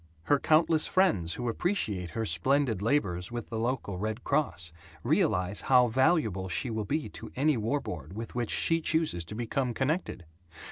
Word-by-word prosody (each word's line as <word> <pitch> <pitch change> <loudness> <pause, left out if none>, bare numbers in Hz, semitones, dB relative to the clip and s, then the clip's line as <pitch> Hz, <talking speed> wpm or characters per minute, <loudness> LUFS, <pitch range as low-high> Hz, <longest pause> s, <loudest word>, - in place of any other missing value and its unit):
Her 145 +7 +3
countless 155 +1 +3
friends 100 - +2
who 120 - -4
appreciate 110 - -1
her 110 - 0
splendid 110 - +1
labors 95 -7 0
with 120 -2 -5
the 115 - -3
local 115 -6 -2
Red 110 +4 -3
Cross 90 - -1 0.3
realize 90 +3 +1
how 125 -2 +4
valuable 110 - +1
she 115 +7 -2
will 110 -1 -2
be 150 +7 -1
to - - -9
any 145 +3 +2
war 115 +6 0
board 90 - -7
with 115 +2 -6
which 120 -2 -2
she 165 0 +2
chooses 160 - 0
to 105 - -8
become 120 +1 -2
connected. 135 - -2
120 Hz, 170 wpm, -29 LUFS, 100-145 Hz, 0.3 s, how